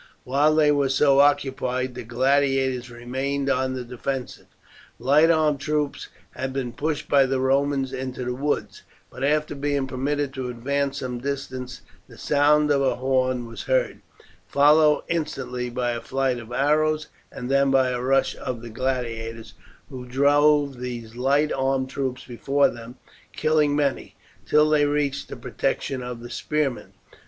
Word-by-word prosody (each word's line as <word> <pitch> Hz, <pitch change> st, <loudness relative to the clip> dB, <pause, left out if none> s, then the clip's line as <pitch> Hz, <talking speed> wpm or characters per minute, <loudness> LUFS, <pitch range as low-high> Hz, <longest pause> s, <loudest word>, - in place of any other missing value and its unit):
While 145 Hz, +4 st, +2 dB
they 150 Hz, -1 st, +4 dB
were 140 Hz, -2 st, +2 dB
so 135 Hz, +1 st, +4 dB
occupied 130 Hz, -3 st, +1 dB
the 125 Hz, -, -6 dB
gladiators 130 Hz, +1 st, +1 dB
remained 135 Hz, +4 st, -2 dB
on 130 Hz, 0 st, 0 dB
the 125 Hz, -, -4 dB
defensive. 125 Hz, +2 st, -5 dB, 0.5 s
Light 145 Hz, +6 st, +4 dB
armed 155 Hz, -3 st, +2 dB
troops 150 Hz, 0 st, -2 dB, 0.2 s
had 130 Hz, +1 st, -4 dB
been 130 Hz, -3 st, -3 dB
pushed 155 Hz, 0 st, -3 dB
by 140 Hz, -2 st, +4 dB
the 130 Hz, 0 st, 0 dB
Romans 135 Hz, 0 st, +1 dB
into 130 Hz, -1 st, -4 dB
the 125 Hz, -, -2 dB
woods, 145 Hz, +4 st, -2 dB, 0.3 s
but 130 Hz, -, -7 dB
after 150 Hz, +2 st, +1 dB
being 145 Hz, -1 st, -1 dB
permitted 135 Hz, +2 st, -2 dB
to 130 Hz, -2 st, -4 dB
advance 140 Hz, +3 st, -2 dB
some 125 Hz, -2 st, -4 dB
distance 130 Hz, -1 st, -5 dB, 0.3 s
the -, -, -15 dB
sound 150 Hz, +1 st, +3 dB
of 140 Hz, -1 st, +3 dB
a 135 Hz, -, +1 dB
horn 130 Hz, -1 st, 0 dB
was 115 Hz, -, -8 dB
heard, -, -, 0 dB, 0.5 s
followed 150 Hz, +1 st, +4 dB
instantly 135 Hz, -7 st, -3 dB
by 120 Hz, 0 st, -1 dB
a 120 Hz, -1 st, -4 dB
flight 130 Hz, 0 st, -1 dB
of 115 Hz, 0 st, -11 dB
arrows, 155 Hz, +3 st, +1 dB, 0.2 s
and 125 Hz, +2 st, -6 dB
then 140 Hz, 0 st, +3 dB
by 135 Hz, -1 st, +3 dB
a 125 Hz, -1 st, -2 dB
rush 135 Hz, +1 st, +1 dB
of 120 Hz, -2 st, -5 dB
the 120 Hz, -, -8 dB
gladiators, 115 Hz, -2 st, -3 dB, 0.4 s
who 125 Hz, -1 st, -8 dB
drove 145 Hz, +1 st, +3 dB
these 120 Hz, -2 st, -6 dB
light 140 Hz, +4 st, +2 dB
armed 135 Hz, 0 st, 0 dB
troops 130 Hz, -3 st, -3 dB
before 135 Hz, +4 st, +1 dB
them, 120 Hz, +1 st, -10 dB, 0.4 s
killing 155 Hz, -2 st, +2 dB
many, 145 Hz, -2 st, -1 dB, 0.3 s
till 150 Hz, 0 st, +4 dB
they 150 Hz, -1 st, +3 dB
reached 145 Hz, -1 st, -1 dB
the -, -, -6 dB
protection 135 Hz, -2 st, -2 dB
of 125 Hz, -1 st, -6 dB
the 120 Hz, -, -9 dB
spearmen. 150 Hz, -2 st, -2 dB
135 Hz, 155 wpm, -24 LUFS, 125-145 Hz, 0.5 s, they